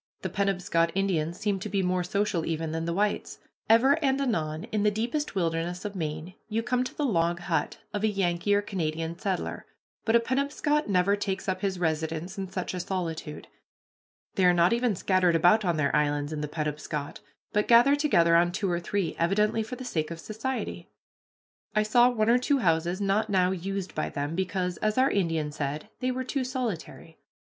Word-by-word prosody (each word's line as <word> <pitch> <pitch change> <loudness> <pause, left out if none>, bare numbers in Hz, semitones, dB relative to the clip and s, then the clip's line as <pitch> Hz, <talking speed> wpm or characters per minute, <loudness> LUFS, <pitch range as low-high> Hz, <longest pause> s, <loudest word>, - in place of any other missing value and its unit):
The - - -2
Penobscot 180 -4 +1
Indians 175 -4 0
seem 205 -2 0
to 210 - -5
be 195 -1 0
more 180 0 +1
social 200 -2 0
even 160 0 -2
than 165 +1 -2
the 170 - -1
whites. 205 +3 -1 0.3
Ever 265 +8 +5
and 270 -1 +2
anon 160 - -1
in 215 - 0
the 210 - +4
deepest 235 +6 -2
wilderness 170 0 -1
of 205 -1 -4
Maine 155 +1 -4 0.2
you 225 +1 -1
come 250 +1 +1
to 255 - -7
the 295 - -1
log 170 -7 +1
hut 175 -2 -1 0.2
of 205 0 -2
a - - +4
Yankee 195 -1 +1
or 205 - +1
Canada 165 -4 -2
settler, 190 -3 -3 0.4
but 225 - +2
a - - +7
Penobscot 280 +3 0
never 195 +1 +3
takes 195 -2 -3
up 190 - -1
his 195 -2 -1
residence 160 +2 -2
in 195 -2 -5
such 185 -1 -4
a 180 - -3
solitude. 165 -4 -4 0.9
They 190 - +2
are 180 0 +5
not 175 +5 +4
even 235 -3 +1
scattered 180 -1 +2
about 175 +7 +5
on 175 -4 +1
their 145 -2 +1
islands 145 0 0
in 150 - -3
the 150 - -2
Penobscot, 150 -1 -4 0.3
but 210 0 +1
gathered 245 +5 +6
together 170 - +4
on 175 +1 +4
two 195 0 -1
or 175 - 0
three, 180 -1 -2
evidently 210 +6 +2
for 220 +3 -5
the 255 - -8
sake 155 -9 -2
of 170 -1 -6
society. 230 +8 -4 0.9
I 215 - +4
saw 240 +3 +5
one 220 -3 0
or 240 +2 +5
two 280 +3 +2
houses 170 -3 +1
not 205 +2 +1
now 185 -2 +3
used 190 +1 -4
by - - -2
them, 145 +2 -3
because, 180 0 -2
as 215 +1 -1
our 260 +1 +4
Indian 165 -6 0
said, 145 0 -4
they 255 - 0
were 255 0 -2
too 260 +1 -2
solitary. 235 - -5
190 Hz, 195 wpm, -27 LUFS, 165-215 Hz, 0.9 s, a